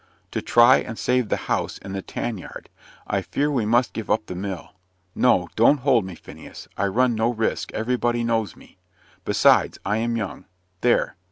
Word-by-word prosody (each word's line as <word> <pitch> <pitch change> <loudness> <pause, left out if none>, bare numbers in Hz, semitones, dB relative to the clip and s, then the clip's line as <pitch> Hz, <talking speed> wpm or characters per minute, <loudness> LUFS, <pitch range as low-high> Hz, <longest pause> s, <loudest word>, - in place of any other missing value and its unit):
"To - - -2
try 120 0 +6
and 115 - -5
save 125 -3 0
the - - +1
house - - -1
and 95 - -8
the 95 - -3
tan 110 +2 -4
yard - - -10 0.4
I 95 - -1
fear 145 +9 -1
we 120 -7 0
must 120 +2 +2
give 110 - -6
up 110 - +1
the - - -6
mill. 95 0 -6 0.4
No, 90 -8 +3
don't 125 +5 +4
hold 125 -6 +3
me, 95 -2 -8
Phineas. - - -12
I 100 - 0
run 120 +5 +2
no 110 +1 +1
risk: 110 -2 -2
everybody 120 +1 0
knows 115 -5 -1
me. - - -19 0.5
Besides, - - +3
I 105 +3 0
am 115 +1 -1
young. 100 -3 -5 0.3
There! 120 -4 +1
115 Hz, 185 wpm, -23 LUFS, 100-120 Hz, 0.5 s, try